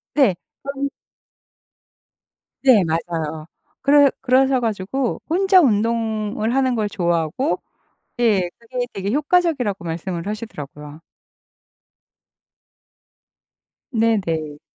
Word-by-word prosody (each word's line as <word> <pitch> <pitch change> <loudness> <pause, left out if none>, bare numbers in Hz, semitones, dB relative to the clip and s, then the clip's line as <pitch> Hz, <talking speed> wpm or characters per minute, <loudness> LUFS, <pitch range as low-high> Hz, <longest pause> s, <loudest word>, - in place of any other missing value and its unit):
네. 265 -11 +4 0.3
그런 280 0 -3 1.7
네 250 -7 +6
맞아요. 160 -1 -3 0.3
그러 285 0 +5
그러셔 265 0 +3
가지고 230 +3 -2
혼자 380 +3 +4
운동을 220 - +1
하는 260 -1 +2
걸 215 -2 0
좋아하고 175 - 0 0.6
예 205 -7 +3
그게 245 +1 -4
되게 195 0 -3
효과적이라고 290 - +1
말씀을 170 +1 -4
하시더라고요. 150 -8 -7 2.9
네네. 170 -10 0
220 Hz, 200 characters per minute, -21 LUFS, 175-265 Hz, 2.9 s, 네